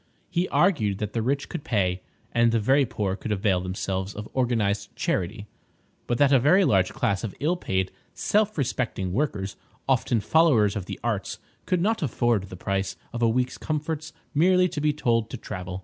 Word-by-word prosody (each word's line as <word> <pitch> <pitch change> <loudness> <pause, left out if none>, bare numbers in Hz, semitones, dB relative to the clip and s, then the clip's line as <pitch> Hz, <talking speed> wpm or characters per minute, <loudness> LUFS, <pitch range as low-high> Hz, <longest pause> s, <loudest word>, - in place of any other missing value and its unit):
He 180 0 0
argued 120 - +2
that 105 0 -4
the 115 - 0
rich 135 +4 -1
could 165 -4 -6
pay, 95 - 0 0.3
and 120 -1 +3
the 115 - +2
very 135 +5 +3
poor 105 -5 -2
could 110 - -5
avail 95 -2 +1
themselves 95 +1 -3
of 105 +1 -6
organised 110 -6 0
charity, 100 +4 -2 0.6
but 120 - 0
that 145 +1 +4
a 135 - +7
very 180 +10 +5
large 95 - +3
class 100 +1 -1
of 110 - -4
ill 160 +5 +1
paid, 95 - -1 0.2
self 215 -1 +1
respecting 120 -9 -1
workers, 100 -7 -2 0.3
often 120 - +2
followers 120 -6 +3
of 95 -3 -4
the - - -6
arts, 110 -5 -2 0.3
could 180 -2 +1
not 220 +4 +1
afford 120 - +1
the 90 -1 -10
price 95 +1 -2 0.2
of 120 - -4
a 115 - +4
week's 125 +2 0
comforts 155 0 -3 0.2
merely 180 +4 +4
to 155 -4 -4
be 150 0 +3
told 115 -6 0
to 130 - -5
travel. 90 -3 -6
115 Hz, 185 wpm, -25 LUFS, 100-145 Hz, 0.6 s, a